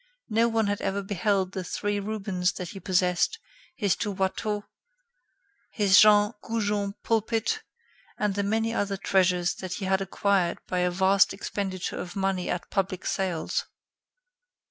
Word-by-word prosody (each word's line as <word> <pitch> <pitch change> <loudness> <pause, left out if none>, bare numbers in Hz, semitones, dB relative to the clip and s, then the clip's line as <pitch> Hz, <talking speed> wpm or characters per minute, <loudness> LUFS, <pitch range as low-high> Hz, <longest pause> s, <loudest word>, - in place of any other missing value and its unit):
No 225 +2 +3
one 225 -1 +1
had 205 0 -1
ever 200 +1 -1
beheld 195 -1 0
the 190 -2 -4
three 205 +3 -2
Rubens 195 -4 -1
that 180 -1 -6
he 195 - -8
possessed, 180 - +1 0.4
his 205 -6 +1
two 210 - -2
Watteau, 205 +2 -1 1.1
his 200 -2 +5
Jean 210 0 +6
Goujon 205 -3 -1
pulpit, 225 - 0 0.6
and 210 -1 0
the 200 - -1
many 220 +3 0
other 200 -3 -1
treasures 180 -2 +2
that 185 -1 -5
he 195 - -4
had 190 0 +1
acquired 195 -1 +1
by 180 - -2
a 180 0 +2
vast 190 +2 +3
expenditure 195 -2 -4
of 175 - -6
money 195 -2 -1
at 180 - -3
public 190 -2 -1
sales. 185 -4 -1
195 Hz, 145 wpm, -27 LUFS, 185-210 Hz, 1.1 s, Jean